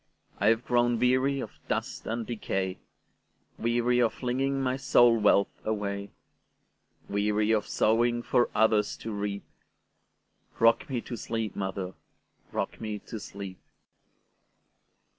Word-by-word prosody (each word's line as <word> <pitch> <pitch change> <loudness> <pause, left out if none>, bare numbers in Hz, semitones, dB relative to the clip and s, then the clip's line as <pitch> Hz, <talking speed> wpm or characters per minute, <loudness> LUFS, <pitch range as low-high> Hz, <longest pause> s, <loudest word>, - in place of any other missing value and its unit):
I 100 - +2
have 115 +2 +3
grown 120 -1 +2
weary 130 +3 +2
of 110 - -8
dust - - -3
and 115 +1 -2
decay,—Weary 115 +3 -3
of 115 - +2
flinging 135 +2 -1
my 130 -1 0
soul 120 -3 +5
wealth 100 -1 +3
away; 100 -2 -2 1.0
Weary 105 +1 +1
of 105 -2 +1
sowing 120 +2 +2
for 120 - +2
others 110 -1 +3
to 115 - -6
reap;—Rock 105 +3 -3
me 125 -3 -1
to 120 - -6
sleep, 115 -1 -3
mother,—rock 95 +2 -6
me 110 -1 -3
to 110 +1 -8
sleep! 100 -2 -8
115 Hz, 110 wpm, -28 LUFS, 105-120 Hz, 1.0 s, soul